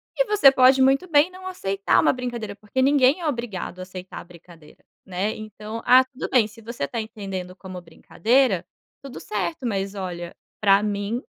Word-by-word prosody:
E - - +2
você 415 - +6
pode 265 0 +5
muito 270 +7 +3
bem 305 +4 +4
não 370 0 -10
aceitar 195 - 0
uma - - +3
brincadeira. 240 -5 -5
Porque 210 +5 -2
ninguém 275 +2 +4
é 330 - -2
obrigado 235 - -4
a - - -6
aceitar 185 0 -9
a - - -9
brincadeira, 170 -3 -17 0.2
né? 190 +3 -2
Então: 215 +1 -8
“Ah, 255 +1 +7
tudo 260 +1 -7
bem. 240 -5 +3
Se 220 +2 -16
você 230 -5 -6
está 230 +12 -3
entendendo 195 -5 -7
como 185 -2 -9
brincadeira, 190 +4 0 0.4
tudo 275 -2 -9
certo. 195 +2 -4
Mas, 200 -2 -2
olha, 175 -3 -6 0.3
pra 200 -1 +4
mim 205 +3 -2
215 Hz, 180 wpm, -23 LUFS, 190-260 Hz, 0.4 s, Ah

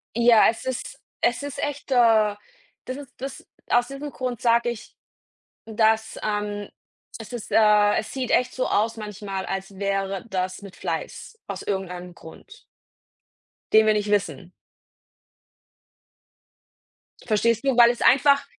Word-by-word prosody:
Ja, 235 -1 +6
es 225 - -5
ist 260 -1 -5 0.2
es 240 +4 +1
ist 285 0 -6
echt 290 -1 -5
äh, 225 -4 +4 0.5
das 255 - -5
ist 285 -3 -11
das 270 +1 -8 0.2
Aus 245 0 +3
diesem 275 +2 -7
Grund 250 -4 -4
sage 235 0 +3
ich, 235 -1 -8 0.7
dass, 220 0 +1
ähm 205 -1 -3 0.5
es 225 +1 -10
ist 240 -3 -7
äh, 210 -1 +5
es 215 - -4
sieht 260 -3 -3
echt 250 0 +2
so 255 - -1
aus 225 +2 0
manchmal, 205 -3 -6
als 195 0 -5
wäre 195 0 -2
das 185 0 -3
mit 200 -2 -11
Fleiß 455 - -5
aus - - -6
irgendeinem 180 -3 -4
Grund 420 - -15 1.1
den 220 0 +7
wir 215 - +4
nicht 210 0 -1
wissen. 200 -3 -1 2.7
Verstehst 230 +2 +1
du? 270 -3 +1
Weil 235 -1 +8
es 240 - -8
einfach 280 +1 +5
220 Hz, 140 wpm, -24 LUFS, 205-245 Hz, 2.7 s, Weil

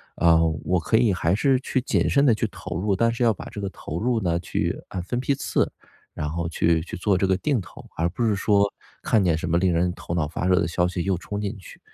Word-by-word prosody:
呃， 85 -1 +4 0.2
我 90 -1 +2
可 110 - +2
以 115 -4 +3
还 90 +1 +1
是 135 +3 +2
去 130 0 -1
谨 - - +1
慎 140 0 +3
地 125 - +5
去 110 +1 -1
投 90 -2 -6
入， 100 0 +1
但 115 +4 +2
是 120 +1 -1
要 115 - +5
把 - - -10
这 105 - -6
个 100 - -2
投 85 -3 -6
入 120 +1 +1
呢 85 -3 0
去 90 - -2
按 90 -2 -4
分 120 +7 -2
批 135 +2 0
次， - - 0 0.4
然 75 - -3
后 85 +1 -3
去 85 -1 +2
去 90 - -7
做 100 +2 +1
这 95 - +1
个 95 -1 +2
定 135 -2 0
投， 85 - -13
而 85 +2 0
不 115 +7 -2
是 105 -3 +2
说 100 0 +2 0.3
看 105 -4 +3
见 85 -3 +2
什 - - -4
么 85 - +3
令 95 0 +2
人 90 +1 +1
头 85 - -5
脑 80 -4 0
发 80 - -4
热 90 0 +4
的 85 - +1
消 90 +1 +1
息 90 -1 -3
又 95 -1 +1
冲 100 +3 -5
进 105 +1 -3
去， 95 - -13
95 Hz, 285 characters per minute, -24 LUFS, 85-110 Hz, 0.4 s, 地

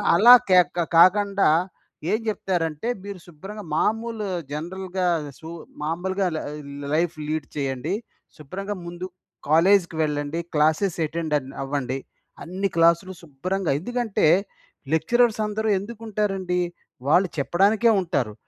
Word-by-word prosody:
అలా 235 +7 +9 0.2
క్యా 180 -1 +8 0.4
కాకండా 200 +1 +5 0.6
ఏం 215 - +2
చెప్తారంటే, 175 -3 -2 0.2
మీరు 200 -2 -7
శుభ్రంగా 195 +6 -9
మామూలు 225 +2 -1 0.3
జనరల్‌గా, 180 +4 -3 0.3
సూ 160 - -9 0.3
మామూలుగా 185 +4 -1
ల్ - - -1
ఆహ్, 150 0 -7 0.4
లైఫ్ 170 +1 0
లీడ్ 155 -1 -2
చేయండి. 135 +3 -2 0.4
శుభ్రంగా 195 +8 -6
ముందు 175 +1 -6 0.4
కాలేజ్‌కి 175 +1 +4
వెళ్ళండి. 145 +2 -2 0.2
క్లాసెస్ 160 +5 +2
అటెండెన్ 150 -4 -2
అవ్వండి. 135 -1 -2 0.4
అన్ని 190 +3 -2
క్లాసులు 170 +3 +3
శుభ్రంగా 170 +4 -3
ఎందుకంటే, 240 -4 0 0.7
లెక్చరర్స్ 230 +8 +2
అందరూ 215 +1 -2
ఎందుకు 225 +3 -9
ఉంటారండి? 195 -4 -1 0.5
వాళ్ళు 180 +5 +4
చెప్పడానికే 200 - +3
ఉంటారు. 125 - -1
180 Hz, 110 wpm, -24 LUFS, 155-200 Hz, 0.7 s, అలా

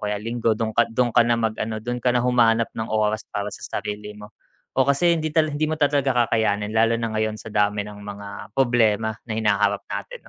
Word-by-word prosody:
kaya 105 0 -1
Linggo 115 0 0
do'ng 110 -1 -1
ka 120 - +4
do'ng 120 0 +1
ka 120 - +7
na 120 0 +2
mag-ano, 110 0 -2
doon 120 +2 -4
ka 125 - +3
na 125 - +2
humanap 115 -2 +3
ng 110 0 -4
oras 110 0 +1
para 100 0 -3
sa - - -10 0.2
sarili 105 0 -6
mo. 105 +1 -12 0.5
O 130 - +5
kasi 170 +5 +3
hindi 155 -1 -2
tala 155 -1 +2
hindi 145 +2 0
mo 155 - 0
ta 145 -2 +3
talaga 135 -4 +2
kakayanin 105 -2 0
lalo 115 +1 +3
na 115 -1 -3
ngayon 110 0 -1
sa 115 - -9
dami 105 0 +1
ng 105 -1 -10
mga 100 0 -9
problema 115 -4 +2 0.2
na - - -3
hinaharap 100 -2 +1
natin - - -7
115 Hz, 220 wpm, -23 LUFS, 105-125 Hz, 0.5 s, ka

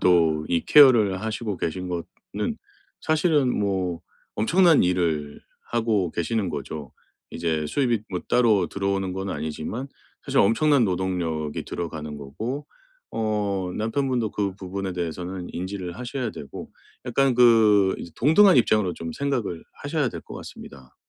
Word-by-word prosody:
또 85 -3 +4
이 85 -1 +2
케어를 115 -10 +6
하시고 110 -2 -3
계신 90 +2 -3
거는 90 - -5 0.4
사실은 150 -4 +2
뭐 95 -4 -1 0.4
엄청난 170 - +4
일을 80 -5 -1 0.3
하고 110 -6 +1
계시는 95 +2 -1
거죠. 75 -2 -6 0.4
이제 80 -2 -1
수입이 120 - 0
뭐 90 -2 -2
따로 110 -7 +3
들어오는 95 0 -1
건 95 +1 -4
아니지만 80 - -4 0.4
사실 - - 0
엄청난 135 +5 +4
노동력이 90 -5 -2
들어가는 80 -3 -5
거고 110 - -5 0.4
어 100 -4 -1
남편분도 120 0 -1
그 100 -2 -2
부분에 95 0 -5
대해서는 90 +1 -4
인지를 90 -1 -5
하셔야 125 -1 -3
되고 70 - -9 0.4
약간 130 +1 +2
그 110 -5 +5
이제 85 - -9
동등한 170 - +5
입장으로 110 -6 +3
좀 85 0 -6
생각을 120 - -2 0.2
하셔야 - - 0
될 - - -7
것 - - -11
같습니다. 65 -2 -11
95 Hz, 300 characters per minute, -24 LUFS, 85-120 Hz, 0.4 s, 케어를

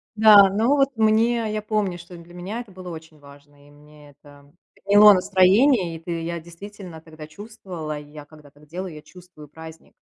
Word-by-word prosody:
Да, 210 -2 +6
ну 225 +8 0
вот 275 -1 +1
мне, 220 +1 +1
я 215 - -3
помню, 210 -4 -3
что 175 0 -13
для 170 +1 -16
меня 190 +6 -7
это 215 -5 -15
было 185 -1 -11
очень 160 -2 -12
важно, 145 0 -19
и 145 - -20
мне 150 0 -19
это 145 0 -21 0.2
подняло 205 +1 +5
настроение, 190 - +2
и 160 - -9
т 165 0 -6
я 170 0 -5
действительно 175 0 -12
тогда 155 -1 -13
чувствовала, 180 -5 -9
я 150 0 -13
когда 150 -1 -18
так 145 +1 -22
делаю, 180 +2 -8
я 150 - -11
чувствую 175 -3 -17
праздник. 160 +2 -14
175 Hz, 185 wpm, -21 LUFS, 155-205 Hz, 0.2 s, Да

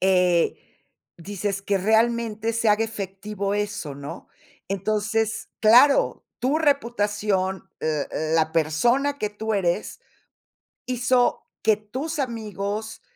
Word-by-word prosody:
Eh, 180 -2 +3 0.6
dices 195 +2 -3
que 200 0 +1
realmente 225 +2 +1
se 230 0 +1
haga 210 +2 +4
efectivo 200 -1 -4
eso, 205 -7 -3
¿no? 140 +1 -8 0.4
Entonces, 215 +3 -1
claro, 245 +6 +5 0.2
tu 275 +5 +2
reputación, 210 - 0
l 155 -2 -1
l 155 +1 -1
la 160 -1 +2
persona 240 - +2
que 210 -4 -2
tú 220 +1 -3
eres, 185 0 -1 0.9
hizo 250 0 +1 0.2
que 215 -1 +4
tus 260 +10 -5
amigos 215 -4 -4
210 Hz, 110 wpm, -24 LUFS, 190-230 Hz, 0.9 s, claro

